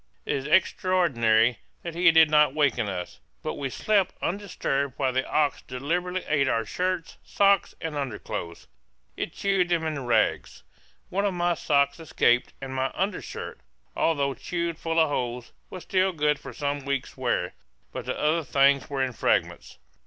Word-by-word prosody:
It - - 0
is 140 0 -3
extraordinary 135 -10 +3 0.2
that 170 - -5
he 175 +1 +5
did 160 -1 +7
not 150 -2 +4
waken 130 -8 +1
us; 90 -2 -6 0.2
but - - -2
we 140 -2 -4
slept 200 +7 +1
undisturbed 150 -8 -2
while 130 - 0
the 130 +1 -1
ox 145 -5 +1
deliberately 175 +8 -3
ate 145 -2 +2
our 115 -1 0
shirts, 180 +6 -2
socks, 200 -1 +2
and 160 -2 -4
underclothes! 115 -10 -5 0.5
It - - -4
chewed 195 -3 0
them 170 -2 +1
into 155 -3 -2
rags. 120 -2 0 0.5
One 200 +2 -1
of 200 -3 0
my 175 0 +1
socks 140 -2 +1
escaped, 145 -6 +2
and 135 -1 -6
my 130 0 0
undershirt, 195 +3 -4 0.4
although 140 -4 +1
chewed 170 +2 -3
full 165 0 0
of 160 -2 +4
holes, 125 -3 -3 0.2
was 185 - -8
still 190 0 +1
good 150 -2 +1
for - - -9
some 145 -1 -3
weeks' 140 -1 -3
wear; 120 -9 -1 0.4
but - - -6
the - - -3
other 160 +2 +1
things 140 +1 +3
were 135 -2 -1
in 130 -1 -2
fragments. - - -1
150 Hz, 165 wpm, -26 LUFS, 130-175 Hz, 0.5 s, did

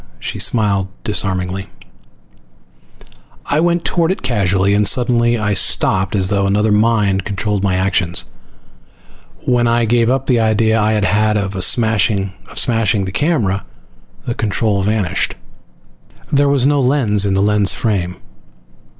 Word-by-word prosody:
She - - -6
smiled 100 -5 +2 0.2
disarmingly. 95 -3 -1 1.8
I 145 - 0
went 170 +1 0
toward 170 -2 0
it 190 - -5
casually, 100 -5 +1
and 105 0 +2
suddenly 120 0 +2
I 105 -2 -1
stopped 95 0 +2
as 95 -2 0
though 100 -1 0
another 105 +2 +1
mind 105 -3 +1
controlled 100 0 -3
my 95 -2 0
actions. 95 -2 -1 1.2
When 120 -1 +1
I 115 0 +1
gave 115 +1 +1
up 135 +1 0
the 125 -3 +1
idea 110 0 +1
I 110 +1 +1
had 105 -2 0
had 105 +2 +1
of 95 -2 -2
smashing 105 -4 +1 0.2
the 110 -5 0
camera, 115 - 0 0.6
the 120 - -2
control 105 -2 -1
vanished. 105 -3 -1 1.0
There 140 0 +2
was 140 -3 +1
no 145 0 +2
lens 125 -6 +1
in 100 -1 0
the 95 - +1
lens 105 -1 +3
frame. 95 -6 -2
105 Hz, 135 wpm, -16 LUFS, 100-120 Hz, 1.8 s, lens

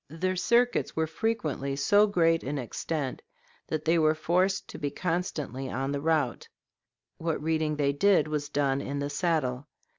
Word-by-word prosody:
Their 185 +5 -1
circuits 240 +6 +2
were 160 - +1
frequently 160 -6 -2
so 205 +9 +4
great 165 -4 +2
in 145 +2 -3
extent 135 +2 -3 0.5
that 155 - -3
they 165 +1 +3
were 155 0 +3
forced 185 +4 +1
to - - -8
be 145 - -1
constantly 155 -6 -3
on 135 +2 -2
the 140 0 -2
route; 155 -5 0 0.7
what 165 -1 -1
reading 155 0 0
they 140 -1 +1
did 195 +4 +3
was 150 -1 -3
done 140 -2 +1
in 140 +1 -4
the 145 0 -2
saddle. 145 -5 -1
155 Hz, 160 wpm, -28 LUFS, 140-175 Hz, 0.7 s, so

